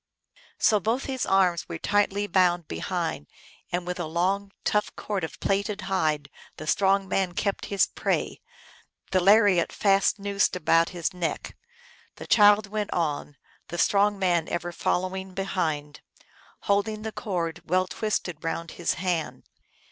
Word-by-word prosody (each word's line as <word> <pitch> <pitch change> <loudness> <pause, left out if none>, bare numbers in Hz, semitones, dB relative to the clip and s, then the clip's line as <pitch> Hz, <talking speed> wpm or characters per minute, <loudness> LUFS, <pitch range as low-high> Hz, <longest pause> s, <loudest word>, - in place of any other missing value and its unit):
" - - -25
So 210 - +4
both 230 +7 -1
his 260 -2 -2
arms 185 -3 +2
were 170 - -4
tightly 205 +2 +1
bound 175 -3 +2
behind, 80 -2 -3 0.4
and 175 0 -1
with 180 0 -4
a 175 - -2
long, 190 +5 0
tough 210 -2 0
cord 200 -4 -3
of 160 - -6
plaited 200 +1 -1
hide 155 -7 0 0.3
the 155 - -7
strong 195 +4 +2
man 190 -2 0
kept 200 -1 -1
his 200 -1 +3
prey, - - -2 0.7
the 185 - +3
lariat 200 -2 +5
fast 195 0 +2
noosed 200 -1 0
about 165 -1 +3
his 175 -2 -3
neck. 175 -2 -3 0.6
The - - -9
child 210 0 +6
went 210 0 -3
on, 150 -3 -2 0.3
the 175 - -6
strong 205 +3 +3
man 175 -4 +1
ever 175 0 -3
following 185 +2 -2
behind, 155 -7 -2 0.6
holding 210 +1 0
the 220 - -4
cord 175 -6 -3
well 185 +1 +3
twisted 180 -5 -3
round 165 0 -3
his 175 - -1
hand. 175 -3 -2
190 Hz, 150 wpm, -26 LUFS, 170-200 Hz, 0.7 s, child